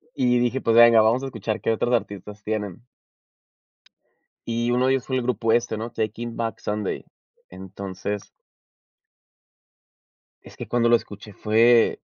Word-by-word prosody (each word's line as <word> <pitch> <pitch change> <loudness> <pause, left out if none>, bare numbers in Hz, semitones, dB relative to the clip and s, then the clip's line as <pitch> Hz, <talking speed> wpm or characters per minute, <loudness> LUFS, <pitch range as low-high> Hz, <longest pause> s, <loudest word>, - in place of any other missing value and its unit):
Y 125 -1 +2
dije: 125 +2 0
"Pues 115 - +1
venga, 115 -1 +8
vamos 115 +5 +2
a - - -3
escuchar 115 -4 -4
qué 115 - 0
otros 120 +2 0
artistas 105 -2 -3
tienen". 105 -2 -4 1.7
Y 120 +1 -1
uno 125 +1 +2
de 135 - +3
ellos 130 -2 -1
fue 130 -1 -1
el - - 0
grupo 115 -2 0
este, 120 -2 0
¿no? 115 +1 -5
Taking 115 +2 -4
Back 115 -1 -3
Sunday. 105 -1 -3 0.4
Entonces 95 +2 -6 2.1
Es - - -15
que - - -8
cuando 120 -1 +1
lo 120 - +6
escuché 105 -1 -6
fue, 115 +3 +3
115 Hz, 150 wpm, -23 LUFS, 105-120 Hz, 2.1 s, venga